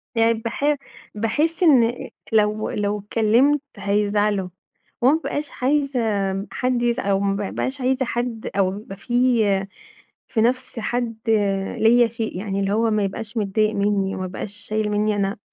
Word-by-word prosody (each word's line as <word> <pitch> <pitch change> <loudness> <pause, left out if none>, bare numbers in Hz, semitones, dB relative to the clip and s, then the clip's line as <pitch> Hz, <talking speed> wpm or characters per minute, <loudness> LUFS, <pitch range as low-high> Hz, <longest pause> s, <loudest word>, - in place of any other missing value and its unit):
يعني 230 0 +4
باح 230 +6 0 0.4
باحس 295 - 0
إن 245 -7 +3 0.2
لو 215 0 +2
لو 205 0 -1
اتكلمت 230 +7 +2 0.2
هيزعلوا، 205 -1 +1 0.5
وما 255 +4 +5
بابقاش 300 -2 -3
عايزة 275 -1 +1 0.5
حد 250 -1 0
يزع 235 -4 0
أو 195 - +2
ما 200 0 0
بابقاش 260 +7 -3
عايزة 260 +1 +1
حد 235 -1 -3
أو 190 -1 +2
يبقى 195 -2 -10 1.3
في 225 - 0
نفس 250 +1 0
حد 235 0 -2 0.6
ليَّ 235 +1 +5
شيء 225 -4 -4
يعني، 195 0 -3
اللي 195 0 0
هو 225 +2 +2
ما 215 -1 +1
يبقاش 220 +3 -5
متضايق 215 +1 +1
مني، 200 -1 0
ما 185 - -3
يبقاش 185 +2 -6
شايل 215 +1 -2
مني 210 0 +1
أنا، 200 0 -1
220 Hz, 145 wpm, -22 LUFS, 205-245 Hz, 1.3 s, وما